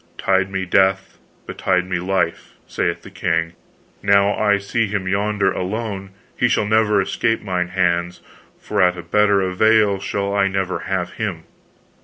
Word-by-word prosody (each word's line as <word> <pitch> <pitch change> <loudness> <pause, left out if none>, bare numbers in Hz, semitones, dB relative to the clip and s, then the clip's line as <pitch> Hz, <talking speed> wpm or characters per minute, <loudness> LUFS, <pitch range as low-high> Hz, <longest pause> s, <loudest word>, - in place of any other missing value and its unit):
Tide 95 0 +1
me 95 -1 -3
death, 95 +1 +1 0.3
betide 90 -1 0
me 90 -1 -2
life, 90 -2 -2
saith - - -2
the - - -12
king, 85 -1 -1 0.5
now 100 0 +3
I 105 -1 +2
see 105 +3 -1
him 100 -2 -3
yonder 100 0 +1
alone, 100 0 -4 0.3
he 125 - +2
shall 115 - +1
never 105 -1 +3
escape 115 +3 0
mine 90 -3 -1
hands, 90 -1 0 0.4
for - - -1
at 90 0 +3
a 90 - -7
better 100 +3 +2
avail 100 +2 +3
shall 100 +1 -2
I 100 -1 +2
never 95 -1 -2
have - - -1
him. - - -4
95 Hz, 155 wpm, -20 LUFS, 90-105 Hz, 0.5 s, now